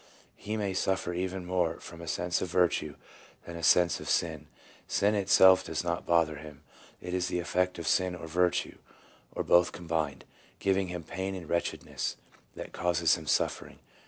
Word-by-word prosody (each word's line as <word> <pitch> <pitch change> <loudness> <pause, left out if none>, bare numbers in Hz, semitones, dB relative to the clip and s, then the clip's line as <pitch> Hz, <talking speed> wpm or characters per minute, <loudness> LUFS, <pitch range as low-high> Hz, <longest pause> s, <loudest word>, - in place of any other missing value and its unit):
He 110 +2 -4
may 100 -3 -1
suffer 95 -1 -1
even 95 +1 -3
more 90 -2 0
from 85 0 -11
a 85 - -9
sense 90 +2 -1
of - - -1
virtue 90 -1 +1 0.5
than 85 - -8
a 85 - -6
sense 85 +2 +4
of - - -7
sin; - - 0 0.4
sin 100 +2 +2
itself 95 -2 +6
does 80 0 -3
not 85 0 -3
bother 85 -3 +2
him; 75 -1 -12 0.4
it 90 0 -6
is 90 -1 0
the 90 - -2
effect 90 +1 0
of 85 -2 -5
sin 90 -1 +2
or 90 - -8
virtue, 90 +2 0 0.6
or - - -1
both 85 0 +4
combined, 80 -6 -3 0.3
giving 95 -1 +1
him 90 -1 -5
pain 95 +4 -4
and 90 -4 -8
wretchedness, 85 +2 -2 0.4
that - - -8
causes 85 -3 +2
him 80 -2 -3
suffering. - - -1
90 Hz, 175 wpm, -29 LUFS, 85-95 Hz, 0.6 s, itself